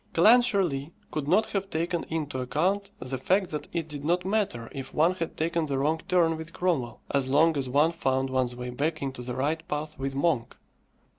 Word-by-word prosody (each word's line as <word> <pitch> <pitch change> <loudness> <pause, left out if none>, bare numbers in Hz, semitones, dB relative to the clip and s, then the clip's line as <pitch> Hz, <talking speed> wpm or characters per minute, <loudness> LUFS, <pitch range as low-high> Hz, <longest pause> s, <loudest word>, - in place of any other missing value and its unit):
Clancharlie 190 - +4 0.2
could 150 -2 -3
not 210 +7 +3
have 195 -1 -2
taken 170 +1 -1
into 150 -5 -3
account 185 +10 0
the 130 0 -4
fact 190 +6 +1
that 150 -1 -4
it 165 -2 -2
did 145 -2 -6
not 175 +4 +1
matter 190 - 0
if 135 -1 -7
one 165 +4 +4
had 165 -3 -5
taken 165 0 0
the 140 -2 -1
wrong 155 +4 +1
turn 170 -3 +3
with 160 +1 -8
Cromwell, 155 -10 -1
as 135 -2 +1
long 160 +4 +4
as 135 -3 -1
one 145 +5 +4
found 135 -5 0
one's 130 -2 0
way 125 0 -5
back 150 +4 -1
into 135 -2 -4
the 125 0 -5
right 155 +5 -1
path 150 0 -4
with 135 0 -3
Monk. 140 -5 0
155 Hz, 200 wpm, -27 LUFS, 135-170 Hz, 0.2 s, Clancharlie